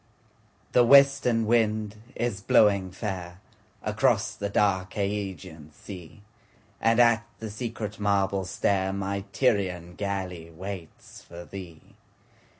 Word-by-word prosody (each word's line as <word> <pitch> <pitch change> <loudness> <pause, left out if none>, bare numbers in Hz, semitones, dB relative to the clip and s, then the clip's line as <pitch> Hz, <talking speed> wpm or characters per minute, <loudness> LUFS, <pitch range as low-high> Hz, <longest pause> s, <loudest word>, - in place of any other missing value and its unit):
THE 125 - +5
WESTERN 140 -3 +5
wind 110 -2 +1 0.2
is 115 -4 -2
blowing 100 -2 +4
fairAcross 105 +4 -3
the 100 - -3
dark 95 -3 +1
Ægean 95 -6 -4
sea, 90 +3 -11 0.6
And 115 +1 +3
at 115 -1 +5
the 110 -1 -6
secret 110 -2 -5
marble 100 -1 +1
stairMy 100 +1 -1
Tyrian 90 -9 0
galley 95 -4 -4
waits 90 0 -9
for 85 0 -11
thee. 90 -5 -11
100 Hz, 100 wpm, -27 LUFS, 95-110 Hz, 0.6 s, THE